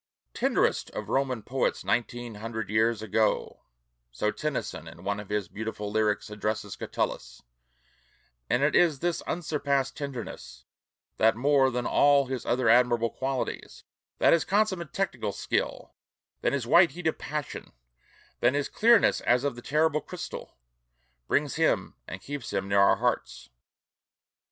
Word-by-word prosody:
"Tenderest - - +1
of - - -5
Roman 130 -5 0
poets 130 +5 -1
nineteen 120 0 -1
hundred 110 -1 -5
years 110 0 +2
ago 110 +1 0 0.2
" - - -50
so 105 - -1
Tennyson 125 - -4
in 85 +2 -12
one 100 +1 -2
of 105 - -9
his 105 -3 -1
own 90 - -32
beautiful 105 -1 -5
lyrics 105 -1 0
addresses 105 -1 -3
Catullus; - - -4 1.1
and 130 - +2
it 145 - +2
is 170 -5 +4
this 175 +4 -1
unsurpassed 140 -5 -1
tenderness 110 - -7 0.5
that 110 0 +4
more 135 +2 +3
than 125 -1 -3
all 140 -1 +4
his 130 -2 -5
other 125 0 +1
admirable 120 0 +4
qualities, 135 -1 -4 0.3
than - - +5
his 170 - +3
consummate 190 -6 0
technical 125 - -2
skill, - - -3 0.5
than - - +1
his 140 -4 -1
white 170 +7 +5
heat 180 0 -9
of 160 - 0
passion, 150 -1 -5 0.7
than 125 +3 +3
his 145 -1 -1
"clearness 230 0 +4
as 125 +2 +2
of 140 -3 -1
the 120 - -9
terrible 150 +2 +1
crystal," 180 - -8 0.7
brings - - 0
him - - +1
and 95 - -7
keeps 145 -1 -6
him 95 -1 -2
near 100 0 +3
our 100 - +6
hearts. - - -2
120 Hz, 150 wpm, -27 LUFS, 105-145 Hz, 1.1 s, our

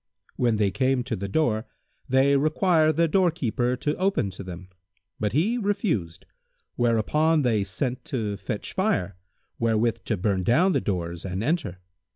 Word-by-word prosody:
When 120 -3 +1
they 105 -2 +1
came 130 +3 +1
to 125 -2 -3
the 100 0 -4
door, 110 -1 0 0.4
they 135 +2 +4
required 155 +2 +3
the 165 +1 +3
doorkeeper 150 - +1
to 150 +4 -2
open 185 - 0
to 95 - -9
them; 90 0 -9 0.5
but 105 -1 0
he 205 - +1
refused, 185 - -1 0.5
whereupon 145 +7 +2
they 110 -5 +2
sent 125 +7 -3
to 110 -6 -2
fetch 100 +1 -5
fire, 100 - 0 0.4
wherewith 115 0 +1
to 110 - -1
burn 95 0 0
down 165 - +3
the - - +1
doors 85 -3 -3
and 95 +2 -3
enter. 125 - -1
120 Hz, 155 wpm, -25 LUFS, 100-155 Hz, 0.5 s, they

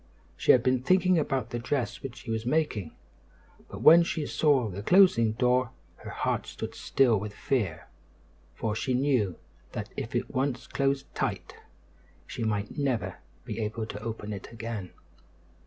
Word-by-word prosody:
She - - +4
had 125 - +5
been 130 0 +2
thinking 185 +3 +3
about 130 -6 -1
the 120 - -2
dress 120 -1 -2
which 130 -3 -6
she 115 - -7
was 110 0 -1
making; 120 - -1 0.7
but - - -7
when 165 +2 +9
she 165 -2 -1
saw 140 -7 +2
the 100 0 -6
closing 115 - +5
door, 125 +1 +2 0.3
her - - -9
heart - - -2
stood - - -6
still 125 -6 +2
with 105 +1 -6
fear; 100 -12 -1 0.7
for 110 - -2
she 130 +3 -1
knew 125 - +1 0.4
that - - -4
if - - -5
it - - -2
once 130 -1 -1
closed 135 0 -1
tight 95 -9 -3 0.7
she - - -5
might 105 +5 -2
never 135 -5 -1 0.3
be - - -5
able 110 +1 -2
to 105 -1 -7
open 110 -2 -5
it 100 - -8
again. 110 -4 -6
120 Hz, 160 wpm, -28 LUFS, 110-135 Hz, 0.7 s, when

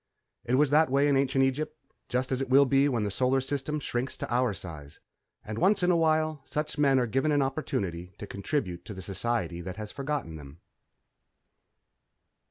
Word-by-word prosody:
_ - - +1
_It 130 - +4
was 145 0 +3
that 155 0 +5
way 140 +2 +3
in 140 - +3
ancient 135 0 +2
Egypt, 150 +4 -1 0.3
just 130 +1 -1
as 130 0 0
it 135 - -3
will 140 +2 +6
be 135 +2 +3
when 120 -5 0
the 100 - -2
Solar 130 +5 +2
System 145 +3 -2
shrinks 125 -2 -3
to - - -4
our 125 -1 +2
size. 80 -7 -8 0.5
And 110 +1 -5
once 190 +2 +3
in 180 - +4
a - - +3
while 155 -2 +1
such 150 +2 -3
men 140 -2 +4
are 125 - +2
given 135 +7 0
an 145 -1 +3
opportunity 100 - -3
to - - -7
contribute 100 - -3
to 105 - -7
the 95 - -7
society 100 -2 -2
that 90 +3 -7
has 105 -1 -6
forgotten 140 - -4
them.... 75 +1 -12
130 Hz, 195 wpm, -28 LUFS, 105-145 Hz, 0.5 s, will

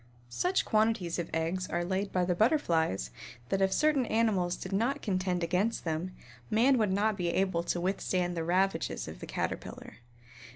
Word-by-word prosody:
Such 360 - 0
quantities 215 -6 +1
of 170 - -3
eggs 170 +3 -1
are 175 0 -1
laid 190 +2 -1
by 180 -1 +1
the 180 - +1
Butterflies 170 - +1 0.4
that 195 - 0
if 190 0 +3
certain 290 0 +2
animals 200 -6 +1
did 185 - -7
not 230 +8 0
contend 185 -3 0
against 185 +7 0
them, 165 +3 -3 0.3
man 245 +4 +4
would 210 -3 +2
not 205 +2 +1
be 175 -3 -1
able 185 -1 +1
to 175 - -1
withstand 180 -1 -1
the 165 - -2
ravages 185 +3 0
of - - -8
the - - -8
Caterpillar. - - -5
185 Hz, 170 wpm, -30 LUFS, 175-215 Hz, 0.4 s, man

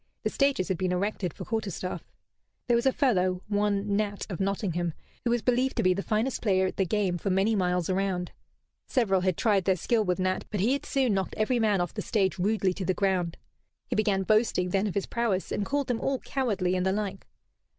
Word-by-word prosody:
The - - 0
stages 275 -10 +1
had 185 -3 -1
been 185 -1 0
erected 185 -1 -1
for - - -8
quarter 220 -3 -2
staff. 180 0 -5 0.6
There 240 - +3
was 235 +3 +2
a - - +5
fellow, 185 -9 +1
one 205 -1 0
Nat 205 -1 -2
of 175 - -4
Nottingham, 180 -4 -1 0.3
who 240 - 0
was 240 -1 +1
believed 250 +1 +1
to - - +2
be 185 0 +4
the 195 - -2
finest 220 +6 -1
player 190 -3 +2
at 185 - -3
the 190 - +1
game 190 -2 0
for 195 - -2
many 195 +4 +2
miles 180 -3 +1
around. 185 -2 -1 0.6
Several 195 -7 +2
had 185 -2 0
tried 200 -5 +2
their 190 - +3
skill 220 +5 +1
with 180 -3 0
Nat, 185 0 0
but 210 - -3
he 225 +8 +3
had 280 - -3
soon 260 -5 +2
knocked 190 -1 -1
every 235 +3 +1
man 220 -2 +3
of - - +2
them - - -18
off - - -28
the - - -3
stage 190 -4 0
rudely 195 -1 +1
to 190 - -5
the 185 - +1
ground. 185 -4 0 0.5
He - - +1
began 205 -3 +2
boasting 215 -3 +2
then 195 +3 +1
of 195 - -4
his 200 - 0
prowess, 230 -6 -1
and 200 - -1
called 285 0 0
them 245 -2 -2
all 270 0 0
cowardly 205 -10 -1
and 180 - 0
the 190 - +2
like. 200 -2 -4
195 Hz, 235 wpm, -28 LUFS, 185-220 Hz, 0.6 s, a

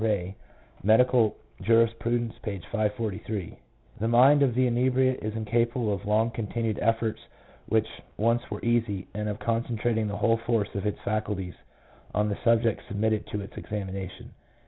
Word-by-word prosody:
Ray, 100 -4 0 0.5
Medical 115 +2 +4 0.3
Jtirisprtidence, 115 +1 +2
p. 105 -3 -4
543: 105 -1 -3 0.2
— - - -26
"The 110 - 0
mind 130 +5 +6
of 130 -4 +3
the 130 0 +3
inebriate 130 +1 +2
is 110 0 -3
incapable 115 0 0
of 100 - -3
the - - -9
long 110 +2 +3
continued 115 -1 -2
efforts 115 0 0 0.5
which 110 0 +2 0.3
once 115 +2 +2
were 105 +1 -5
easy, 115 -5 +1
and 105 +1 -2
of 105 - -3
concentrating 115 -1 0
the 100 0 -3
whole 115 -1 +3
force 115 -2 -1
of 100 +1 -2
its 105 - -1
faculties 105 -4 -2 0.6
on 105 +1 +2
the 100 - -2
subject 115 -1 +3
submitted 110 +1 0
to 105 - -3
its 100 - -10
examination." 95 -3 -6
110 Hz, 155 wpm, -27 LUFS, 105-115 Hz, 0.6 s, mind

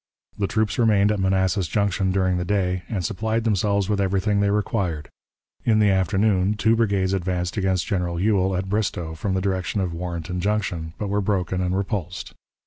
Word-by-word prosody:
The 100 - -1
troops 110 0 0
remained 105 -3 +4
at 105 - -1
Manassas 95 -1 +1
Junction 95 +1 0
during 95 -1 +1
the 90 - -1
day, 90 -1 0
and 95 -6 -2
supplied 110 +2 -1
themselves 100 -2 +1
with 105 -1 0
everything 100 +1 +1
they 100 0 +2
required. 100 -7 -1 0.5
In 110 -2 +3
the 105 -2 +4
afternoon, 95 +1 +2
two 110 +2 +3
brigades 100 -4 +1
advanced 90 -1 -1
against 95 -4 0
General 90 -4 -1
Ewell, 95 -1 +2
at 95 +1 -3
Bristoe, 95 -5 -2
from 95 +4 -2
the 95 - 0
direction 95 +1 -1
of 90 -3 -1
Warrenton 85 +1 -4
Junction, 95 -5 -2
but 105 - -3
were 100 +1 +1
broken 95 -2 -1
and 90 +1 0
repulsed. 95 -3 -4
95 Hz, 180 wpm, -23 LUFS, 90-105 Hz, 0.5 s, remained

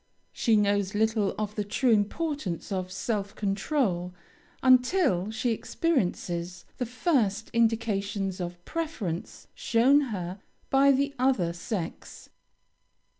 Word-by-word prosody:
She 225 - +2
knows 205 -1 +1
little 220 -1 +1
of 210 -1 -3
the 210 - -2
true 235 +5 +1
importance 215 - -1
of 185 -1 -2
self 200 +1 -3
control, 195 - -1 0.5
until 255 - +4
she 220 +2 -1
experiences 180 - -1
the 250 - -1
first 230 - 0
indications 205 -4 0
of 175 0 -6
preference 255 - -4
shown 255 +5 +4
her 185 -2 -4 0.3
by 275 +1 +6
the 280 +1 +1
other 245 -10 +2
sex. 175 0 -6
210 Hz, 110 wpm, -27 LUFS, 190-255 Hz, 0.5 s, by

